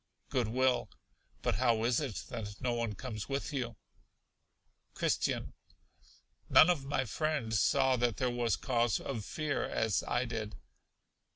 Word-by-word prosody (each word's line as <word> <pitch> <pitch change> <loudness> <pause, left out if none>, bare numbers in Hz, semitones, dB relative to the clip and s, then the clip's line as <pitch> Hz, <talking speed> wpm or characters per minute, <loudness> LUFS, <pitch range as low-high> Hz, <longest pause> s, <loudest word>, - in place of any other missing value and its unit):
Good 125 -4 +1
will. 130 +2 +1 0.5
But 95 - +1
how 115 -2 +2
is 120 +1 +3
it 135 -9 -3
that 105 -2 -6
no 125 -2 0
one 115 -3 -2
comes 110 -1 -6
with 140 +1 -2
you? 120 -4 -2 1.2
Christian. - - 0 1.0
None 180 - +8
of 145 -6 -2
my 135 -1 0
friends 125 -4 0
saw 130 -2 +3
that 120 -4 +1
there 125 -1 +1
was 120 -3 +1
cause 120 -4 +1
of 120 -6 -4
fear, 150 +5 -2
as 110 -3 0
I 120 +1 +1
did. 110 -4 -4
120 Hz, 145 wpm, -32 LUFS, 110-130 Hz, 1.2 s, None